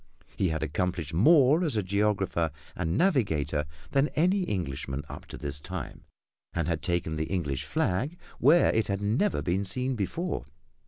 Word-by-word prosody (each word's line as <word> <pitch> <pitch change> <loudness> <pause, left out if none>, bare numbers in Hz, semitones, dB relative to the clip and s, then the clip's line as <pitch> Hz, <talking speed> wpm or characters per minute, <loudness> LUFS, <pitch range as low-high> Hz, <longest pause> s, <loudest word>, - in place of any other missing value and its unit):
He 95 - +1
had 80 0 -1
accomplished 85 0 -2
more 145 - +5
as 155 -8 -1
a 105 - +1
geographer 95 -4 +1 0.3
and 85 0 -1
navigator 80 - +1 0.3
than 140 +1 +3
any 185 +5 +3
Englishman 70 - -3
up - - -9
to - - -8
his 70 0 -4
time, 90 -3 -7 0.5
and 85 -2 -1
had 85 -2 -1
taken 85 -3 -1
the 80 - -1
English 80 -7 -2
flag 130 - -1 0.2
where 155 +7 +6
it 110 - +1
had 100 0 -2
never 120 - +1
been 95 +3 0
seen 125 +7 -1
before. 160 - -2
95 Hz, 160 wpm, -28 LUFS, 80-130 Hz, 0.5 s, where